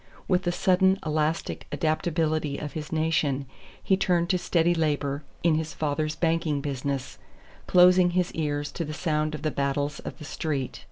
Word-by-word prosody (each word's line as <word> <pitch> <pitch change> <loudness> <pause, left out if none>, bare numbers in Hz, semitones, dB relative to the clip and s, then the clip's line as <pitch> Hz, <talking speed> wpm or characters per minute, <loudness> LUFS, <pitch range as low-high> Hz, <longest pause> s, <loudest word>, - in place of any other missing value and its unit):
With 185 0 +1
the 175 - +2
sudden, 190 +2 +3
elastic 155 +1 -1
adaptability 155 -2 0
of 150 - -6
his 155 -2 -6
nation 155 -4 +1 0.4
he 190 - +3
turned 175 -2 +1
to 185 -2 +2
steady 170 0 +2
labor 145 -3 0 0.2
in 170 -1 +4
his 160 0 -5
father's 155 0 -1
banking 165 -3 +1
business, 140 -1 -3 0.5
closing 180 0 +6
his 180 -1 +1
ears 145 -2 -2
to 170 - -3
the 155 -1 -5
sound 155 -2 0
of - - -8
the 155 - 0
battles 140 +1 -1
of - - -7
the 150 - -9
Street. 145 -4 -3
155 Hz, 165 wpm, -26 LUFS, 145-170 Hz, 0.5 s, closing